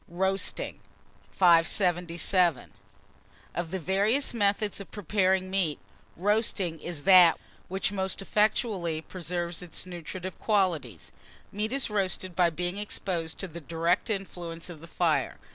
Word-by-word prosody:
ROASTING. 190 +3 -1 0.5
577. 175 -1 +3 0.8
OF 175 -1 -3
THE 190 - -3
VARIOUS 205 - +2
METHODS 205 -2 +1
OF 200 - -9
PREPARING 190 -1 0
MEAT, 180 -6 +1 0.4
ROASTING 195 -3 0
is 165 -3 -5
that 180 -3 +7 0.3
which 190 +1 -1
most 190 -1 -2
effectually 195 -5 0
preserves 175 -1 -4
its 180 0 -5
nutritive 180 +1 -7
qualities. 170 - 0 0.4
Meat 210 +2 -2
is 270 -4 0
roasted 185 -3 -1
by 175 -1 +4
being 175 +4 -3
exposed 175 -5 -3
to 195 - -4
the 170 0 -9
direct 170 - 0
influence 175 -4 -4
of 160 -3 -11
the 165 - -10
fire. - - 0
185 Hz, 125 wpm, -28 LUFS, 170-195 Hz, 0.8 s, that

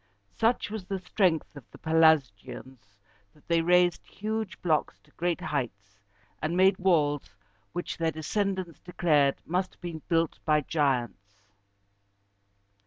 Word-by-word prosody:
Such 230 -1 +1
was 215 -4 -5
the 195 0 -3
strength 180 -4 0
of 140 - -10
the - - -14
Pelasgians, 130 -8 +1 0.4
that 150 - -25
they 170 -1 +3
raised 175 +1 +3
huge 220 -1 -4
blocks 160 -4 0
to - - -27
great 175 -1 -1
heights, 105 -7 -4 0.4
and 165 +3 -1
made 190 0 +4
walls 145 - +1 0.4
which 175 +1 -4
their 165 -1 +2
descendants 185 +2 -2
declared 150 -6 +2
must 185 +2 -2
have - - -38
been 170 -3 -6
built 165 -1 +1
by 150 -1 +3
giants. 120 -10 -2
165 Hz, 130 wpm, -28 LUFS, 145-180 Hz, 0.4 s, made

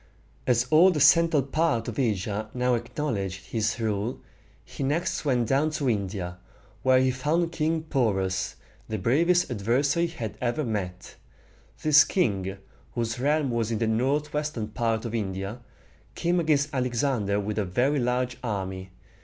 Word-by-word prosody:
As 120 -1 +3
all 170 +5 +7
the 165 -5 0
central 160 0 +5
part 140 -4 0
of 120 +1 -4
Asia 105 -2 -1
now 125 0 +1
acknowledged 115 -6 -3
his 110 0 0
rule, 110 +1 -2 0.5
he - - -9
next 155 +6 -1
went 125 -5 +1
down 135 +5 +2
into 155 -3 -1
India, 95 -5 -2 0.4
where 130 0 +4
he 130 0 +3
found 155 +6 0
King 160 0 0
Po´rus, 100 -10 0 0.3
the 110 - -2
bravest 165 - +2
adversary 135 - +1
he 165 - -11
had 110 -4 -5
ever 125 +5 0
met. 95 -6 -4 0.7
This 150 -1 +7
king, 100 - -1 0.4
whose 115 -1 -2
realm 145 0 +1
was 115 -2 0
in 115 - -1
the 115 - 0
northwestern 135 +1 -1
part 115 0 -1
of 115 - -4
India, 100 0 -3 0.6
came 175 +1 +1
against 150 -2 +1
Alexander 120 -5 0
with 105 +1 -2
a - - +1
very 125 +10 +1
large 125 0 0
army. 95 -4 -4
120 Hz, 150 wpm, -26 LUFS, 105-150 Hz, 0.7 s, all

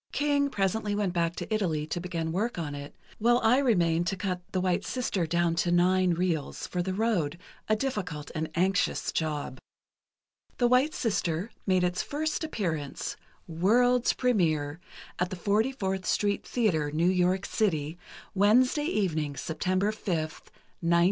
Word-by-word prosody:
King 285 -1 +1
presently 205 -1 0
went 205 -4 0
back 170 -1 0
to - - -4
Italy 165 -8 0
to 165 +3 -3
begin 170 -2 -3
work 210 +7 -1
on 155 -4 -3
it, 145 0 -8 0.2
while 240 +2 +4
I 235 +4 +5
remained 175 -10 +2
to 195 - -1
cut 185 -2 -2
'The 185 - 0
White 180 -1 +1
Sister' 205 -9 -1
down 170 0 +1
to 175 0 +1
nine 180 0 +3
reels, 170 -4 -2
for 180 - -2
the 185 +1 -2
road, 190 -8 0 0.3
a 215 - +4
difficult 190 - -3
and 160 -1 -2
anxious 185 +2 +1
job." 150 -5 -2 1.0
"The 245 - +3
White 255 +5 +3
Sister" 195 -4 -1 0.2
made 185 -1 +3
its 180 0 0
first 310 +2 -2
appearance, 165 - -3 0.3
"World's 235 +9 +3
Premiere," 160 - +1 0.4
at 180 0 +1
the - - -4
44th 200 0 0
Street 205 -1 0
Theatre, 175 -11 +1
New 155 +3 0
York 185 +1 +2
City, 160 -6 -1 0.3
Wednesday 250 +9 +4
evening, 160 - -1
September 185 +5 0
5, 215 - -12
1923. 155 -5 -3
185 Hz, 150 wpm, -28 LUFS, 165-215 Hz, 1.0 s, I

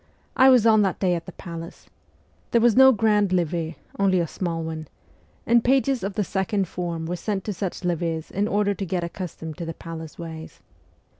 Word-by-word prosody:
I 260 +1 +7
was 250 -4 +6
on 220 -2 +6
that 195 -3 0
day 185 -2 +2
at 170 +1 -4
the - - -6
palace. 170 -2 -9 0.6
There 235 - +3
was 230 -1 +4
no 265 +1 +8
grand 210 -4 +2
levee, 170 -2 -1 0.2
only 190 -2 +3
a 170 - +1
small 165 0 -3
one; 160 -1 -5 0.6
and 235 0 +4
pages 265 0 +2
of 195 0 -4
the 210 - +1
second 195 +1 -1
form 170 -2 -4
were 175 +2 -2
sent 195 +2 -3
to 210 - -3
such 190 0 -4
levees 165 -2 -2
in 205 +2 0
order 205 -1 +1
to 195 0 -4
get 175 0 -1
accustomed 170 -3 -6
to 170 - -3
the 165 -1 -5
palace 160 -2 -8
ways. 160 -2 -8
185 Hz, 200 wpm, -24 LUFS, 165-210 Hz, 0.6 s, no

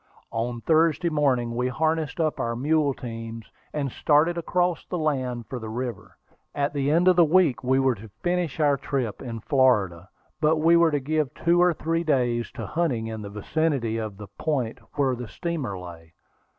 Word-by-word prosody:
On 120 +1 -3
Thursday 160 +2 +3
morning 130 -6 +1
we 125 +1 0
harnessed 155 +4 -1
up 155 -2 0
our 115 0 -1
mule 145 +2 +1
teams, 115 -2 -7 0.2
and 140 -3 -2
started 155 +6 +3
across 175 +1 0
the 180 - -4
land 130 -7 -1
for 125 +4 -6
the 110 -1 -7
river. 120 +1 -5 0.4
At 145 0 0
the 140 -1 0
end 170 +4 +3
of 185 - +6
the 175 - +6
week 160 -6 +3
we 130 +1 +2
were 135 -1 +3
to 110 0 -11
finish 175 -3 -1
our 145 -2 +3
trip 130 -6 -3
in 115 -3 -6
Florida; 105 - +2 0.3
but 155 0 +3
we 165 +2 +4
were 170 -1 +5
to 145 -2 0
give 150 0 -1
two 170 +1 +3
or 180 0 +5
three 165 +2 -1
days 125 -6 +1
to - - -6
hunting 150 -9 -1
in 110 -1 -5
the 100 - -7
vicinity 120 +2 -1
of 110 -3 -5
the 105 - -8
point 130 -8 -1 0.2
where 135 -3 +1
the 120 -1 -7
steamer 150 - -4
lay. 85 -2 -11
135 Hz, 190 wpm, -25 LUFS, 115-160 Hz, 0.4 s, of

